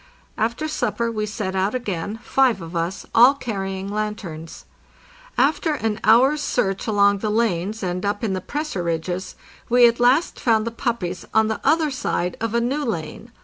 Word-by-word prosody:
After 235 +8 -1
supper 235 -6 -1
we 215 -1 -2
set 205 -3 -4
out 190 +4 0
again, 205 -3 -3
five 260 -6 +2
of 165 0 -8
us, 170 +3 -2
all 245 +5 +7
carrying 195 -6 -4
lanterns. 200 -6 -5 0.7
After 300 +2 +2
an 225 -5 -2
hour's 265 +7 +5
search 195 -8 -1
along 200 -2 +3
the 215 - -2
lanes 210 -1 0
and 180 0 -2
up 205 +1 -2
in 210 -4 0
the 185 - -3
pressure 295 - -3
ridges 175 +2 -3 0.3
we 245 0 +7
at 235 0 0
last 250 +7 +3
found 220 -2 +2
the 230 - -2
puppies 225 -6 -3
on 220 0 +4
the 220 - -3
other 310 +1 +3
side 180 -8 -2
of 230 0 -2
a - - +4
new 265 +5 -1
lane. 220 - -5
215 Hz, 175 wpm, -22 LUFS, 190-245 Hz, 0.7 s, all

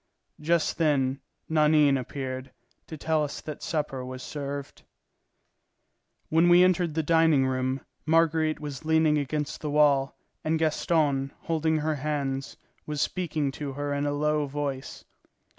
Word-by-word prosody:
Just 165 +2 +1
then 140 -4 +1 0.3
Nanine 150 -2 +4
appeared, 130 0 -5 0.4
to 160 - -7
tell 155 +1 +1
us 145 - -4
that 155 -2 -7
supper 145 -5 -2
was 130 0 -7
served. 140 -1 -6 1.5
When 165 +2 +4
we 175 +1 +7
entered 175 -3 +2
the 160 - +1
dining 160 -3 +4
room, 130 +1 -1 0.3
Marguerite 160 -1 +2
was 145 -3 -6
leaning 160 -1 +3
against 150 +1 -3
the 150 - -3
wall, 145 -2 +3 0.3
and 160 +1 +1
Gaston, 150 -3 +1
holding 160 -1 0
her 155 0 -1
hands, 140 -2 -3 0.3
was 150 -1 -3
speaking 155 -4 -1
to 140 0 -5
her 145 +1 -3
in 145 +1 -1
a - - 0
low 150 0 0
voice. 140 -1 -5
150 Hz, 140 wpm, -27 LUFS, 140-160 Hz, 1.5 s, we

